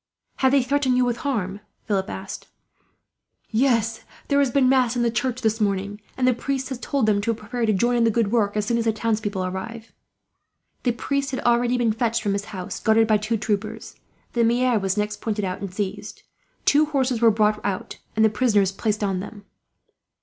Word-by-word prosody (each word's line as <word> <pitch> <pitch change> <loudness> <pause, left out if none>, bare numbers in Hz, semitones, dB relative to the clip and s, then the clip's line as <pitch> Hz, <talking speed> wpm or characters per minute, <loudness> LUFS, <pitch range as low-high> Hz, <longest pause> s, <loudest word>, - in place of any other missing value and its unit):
"Have 265 -1 +3
they 275 -2 +4
threatened 260 -1 +1
you 250 - +3
with 240 -1 -1
harm?" 205 -9 -2 0.3
Philip 195 -3 -1
asked. 190 +1 -7 1.0
"Yes; 230 -2 +1 0.3
there 280 -1 +3
has 280 -2 +3
been 260 +1 +3
mass 255 -2 +3
in 240 - +1
the 235 - +2
church 250 +2 -1
this 220 0 +1
morning, 200 0 -1 0.2
and 255 -1 +2
the 255 - +5
priest 265 +2 -3
has 260 -3 -5
told 275 -2 0
them 205 -1 +2
to 230 +2 0
prepare 230 +2 -3
to - - +4
join 240 +5 +2
in 235 - +3
the 230 - +4
good 225 -2 +1
work, 215 -3 +1
as 210 - 0
soon 235 +2 +1
as 230 - -1
the 225 - +2
townspeople 210 -3 -1
arrive." 220 +5 -6 0.9
The 245 - +1
priest 280 +3 -2
had 260 - -3
already 240 +1 +2
been 235 -3 +2
fetched 230 0 0
from 205 -2 0
his 200 0 -2
house, 190 -5 -6
guarded 225 0 +4
by 215 -1 +4
two 215 +2 -1
troopers. 215 +1 -3 0.4
The 235 - +2
maire 240 0 +3
was 195 0 -1
next 210 0 -2
pointed 210 -2 -2
out, 185 0 -4
and 195 -2 -5
seized. 205 +1 -5 0.4
Two 300 +2 +4
horses 260 -5 0
were 230 - +7
brought 210 -1 +1
out, 190 -2 -3 0.2
and 220 0 +4
the - - +5
prisoners 210 -4 +2
placed 210 +1 -2
on 195 -2 0
them. 205 +1 -9
225 Hz, 210 wpm, -23 LUFS, 205-245 Hz, 1.0 s, were